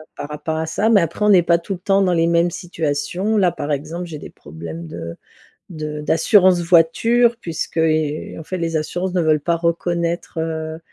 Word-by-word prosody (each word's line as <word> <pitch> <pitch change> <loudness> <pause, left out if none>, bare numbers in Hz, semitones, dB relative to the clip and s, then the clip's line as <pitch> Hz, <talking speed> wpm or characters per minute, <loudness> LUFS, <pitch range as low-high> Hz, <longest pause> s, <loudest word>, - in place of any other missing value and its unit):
par 145 - -7
rapport 150 +1 -4
à 160 0 -2
ça, 205 +7 -1
mais 205 -4 +5
après, 170 +5 -1
on - - +4
n'est 185 -4 +6
pas 170 0 +3
tout 185 +4 -5
le 180 - -7
temps 195 +2 +2
dans 185 -2 +2
les 165 -1 +2
mêmes 170 +1 +2
situations. 170 +5 -2
Là, 190 -4 +3
par 150 -3 -3
exemple, 160 +5 -4
j'ai 160 -3 -7
des - - -9
problèmes 80 +1 -9
de 85 +1 -7 0.5
de 155 -3 -5
d'assurance 180 +4 +4
voiture 225 +8 +3
puisqu'i 155 -3 -1
heu, - - -8
en - - -10
fait, 185 - -5
les 165 -1 -2
assurances 175 +4 -2
ne 180 - +1
veulent 155 -1 +2
pas 170 +3 0
reconnaître, 170 0 -2
heu, 160 0 -4
165 Hz, 205 wpm, -20 LUFS, 155-180 Hz, 0.5 s, n'est